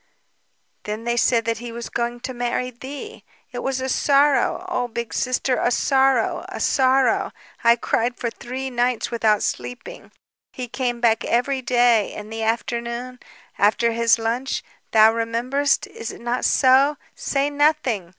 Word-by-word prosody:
"Then 215 +2 -4
they 235 0 0
said 235 -1 +2
that 230 -1 -1
he 240 0 -7
was 235 0 -6
going 240 0 -3
to 255 - -5
marry 245 +1 -2
thee. 275 - -9 0.3
It 245 - -5
was 265 +1 -2
a 260 - -3
sorrow; 285 +6 +2
oh, 250 -9 -1
Big 235 0 -5
Sister, 255 0 0
a - - +1
sorrow... 265 -2 +2
a - - -6
sorrow! 260 0 +2 0.3
I 235 0 +6
cried 240 +1 -1
for 235 - -3
three 260 +3 -6
nights 245 0 0
without 220 -3 +2
sleeping. 250 - -5 0.4
He 250 -1 -5
came 240 -1 -3
back 230 -1 +3
every 260 +3 0
day, 240 -3 +3
in 210 +1 -8
the 225 0 -5
afternoon, 235 +2 -3 0.4
after 220 +3 +3
his 230 0 +3
lunch... 235 +4 -2 0.3
thou 220 0 +6
rememberest, 240 +5 0
is 225 - -8
it - - -12
not 240 +1 -1
so? 275 +2 +4 0.2
Say 280 +1 -1
nothing 285 - +1
245 Hz, 155 wpm, -22 LUFS, 230-265 Hz, 0.4 s, I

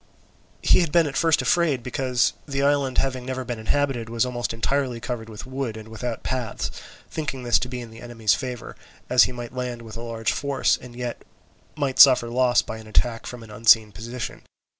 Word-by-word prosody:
He - - +6
had 170 -4 +1
been 170 0 +5
at 140 -2 -4
first 165 -2 +3
afraid, 155 -8 +2
because 125 -1 +1
the 140 -1 -1
island 140 -2 +2
having 130 -2 0
never 130 0 -4
been 120 -2 -4
inhabited 120 0 0
was 115 +1 +1
almost 120 -1 -2
entirely 125 +1 -1
covered 115 -2 -5
with 105 -2 -8
wood 130 -4 -4
and 110 0 -10
without 115 +1 -5
paths, 125 -4 -3 0.4
thinking 140 -5 -4
this 120 -1 +4
to 125 - -3
be 125 0 -5
in 115 -2 -9
the 115 - -12
enemy's 115 -3 +1
favour, 125 -4 -5 0.4
as 125 -3 +7
he - - -4
might 120 -1 -7
land 125 -2 -4
with 110 0 -9
a - - -6
large 115 -1 -2
force, 140 -1 +1
and 120 -1 -12
yet 120 -1 -5 0.5
might 140 -3 -2
suffer 130 -4 +8
loss 125 0 +3
by 110 - -6
an 110 - -12
attack 115 +1 0
from 125 -2 -8
an 110 - -12
unseen 110 -1 +5
position. 115 +5 -6
125 Hz, 205 wpm, -24 LUFS, 115-130 Hz, 0.5 s, suffer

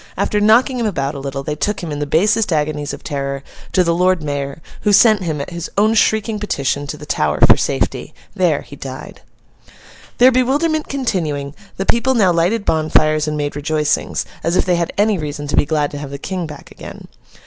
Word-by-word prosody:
After 210 - 0
knocking 245 +5 +4
him 230 - 0
about 140 -8 -2
a - - -6
little, 135 0 -5
they 150 - -3
took 200 +6 -2
him, 165 - -4
in 145 - -4
the 145 - -2
basest 205 +7 +2
agonies 150 -1 -1
of - - -8
terror, 140 -1 -3 0.3
to 185 - +3
the 170 -1 +1
Lord 180 -1 +2
Mayor, 140 0 -3 0.2
who 210 - +2
sent 215 0 +6
him, 160 -5 -2
at 140 - -5
his 170 -1 -5
own 215 +2 +4
shrieking 220 0 +1
petition, 145 -8 -2
to 150 - -5
the 150 - -10
Tower - - 0
for - - +7
safety. - - -2 0.2
There, - - +2
he - - -12
died. - - -9 1.0
Their 255 +2 +7
bewilderment 290 +5 +1
continuing, 160 - -2 0.2
the 195 - -2
people 235 +4 +2
now 200 -6 +4
lighted 180 +6 +1
bonfires 155 -1 +2
and 150 0 -2
made 145 -1 -2
rejoicings, 150 0 -1 0.2
as 170 - 0
if - - +2
they 180 -2 +2
had 170 -1 -1
any 205 -2 +2
reason 145 -1 -5
to - - 0
be - - +3
glad 150 -1 0
to 145 - -6
have 145 -1 -6
the 140 - -6
King 180 +3 -4
back 150 -2 -11
again. - - -11
165 Hz, 210 wpm, -18 LUFS, 145-210 Hz, 1.0 s, for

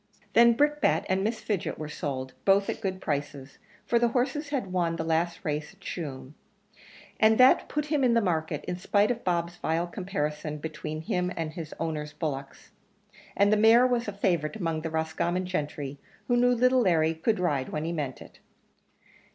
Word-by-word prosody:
Then 235 0 +7
Brickbat 295 +4 +2
and 190 +1 +1
Miss 220 +2 -2
Fidget 205 -5 -2
were 155 - -5
sold, 130 -3 -4
both 195 0 +3
at - - -8
good 190 -2 -2
prices; 145 -2 -4 0.3
for 235 - +2
the 240 - +3
horse 270 +5 -1
had 245 -11 -3
won 170 -2 +1
the 165 - -3
last 165 +3 -1
race 150 +1 -3
at - - -32
Tuam, 145 -8 -6 0.9
and 220 0 +5
that 255 +1 +5
put 300 0 -1
him 300 -1 0
up - - +4
in 240 - +4
the - - +5
market, 160 -5 -1
in 180 - -3
spite 205 +4 +2
of 235 -1 -4
Bob's 175 -1 -1
vile 165 +1 0
comparison 150 -5 -3
between 155 0 -5
him 180 +2 -1
and 160 -2 -3
his 160 -2 -7
owner's 150 -2 -3
bullocks; 140 -4 -5 0.7
and 200 +1 +4
the - - +4
mare 225 +3 +6
was 245 -2 0
a - - -1
favourite 180 -5 0
among 165 -6 -2
the 160 - -3
Roscommon 160 +3 -1
gentry, 145 -5 -4 0.3
who 245 - +2
knew 245 +1 +4
little 255 +1 +4
Larry 165 -6 +3
could 185 +6 0
ride 145 -7 0
when 150 +1 -3
he 165 - -2
meant 145 -6 -4
it. - - -18
175 Hz, 190 wpm, -27 LUFS, 155-220 Hz, 0.9 s, Then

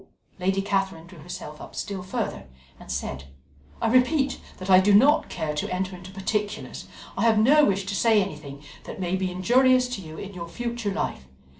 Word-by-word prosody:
Lady 190 +2 +1
Catherine 195 -4 -1
drew 170 -1 -14
herself 150 -2 -8
up - - -10
still 195 -2 -4
further, 180 - -4 0.3
and - - -9
said: 65 +1 -4 0.5
"I - - +1
repeat 265 +3 +3 0.2
that 185 - -7
I 185 -1 +8
do 200 +2 +5
not 280 +8 +5
care 160 -3 -3
to 150 - -3
enter 185 +1 -2
into 180 +1 -11
particulars. 205 +2 -3 0.3
I - - -2
have 230 -2 +4
no 290 +8 +6
wish 195 -1 0
to 200 - -3
say 220 +1 +4
anything 150 -7 -5 0.2
that - - -8
may 180 0 -1
be 190 0 -1
injurious 250 +7 +4
to 245 -6 -4
you 160 -2 -10
in 200 0 -7
your 170 -2 -6
future 235 +3 -3
life. 65 - -3
195 Hz, 190 wpm, -25 LUFS, 180-225 Hz, 0.5 s, I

